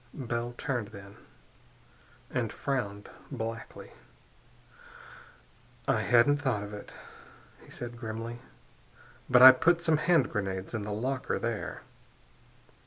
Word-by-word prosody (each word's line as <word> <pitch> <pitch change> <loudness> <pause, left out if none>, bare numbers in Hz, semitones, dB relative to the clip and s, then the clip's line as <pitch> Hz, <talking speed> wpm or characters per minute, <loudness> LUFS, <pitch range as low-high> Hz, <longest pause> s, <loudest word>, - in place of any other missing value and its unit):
Bell 120 -2 -3
turned, 120 -6 -2
then, 100 -2 -12 1.2
and - - -1
frowned 105 -7 -3 0.2
blackly. 115 0 -6 2.0
"I 130 -5 +2
hadn't 120 +6 +4
thought 130 -8 -1
of 105 +1 -8
it," 105 - -9 0.7
he - - -17
said 120 -1 -7
grimly, 115 +1 -5 0.9
"but 125 0 +7
I 130 - +14
put 170 +6 +2
some 160 -2 +3
hand 160 -3 +2
grenades 95 -1 -3
in 110 - -2
the 105 +1 -5
locker, 130 +5 -2
there." 115 -2 -4
120 Hz, 110 wpm, -29 LUFS, 105-130 Hz, 2.0 s, I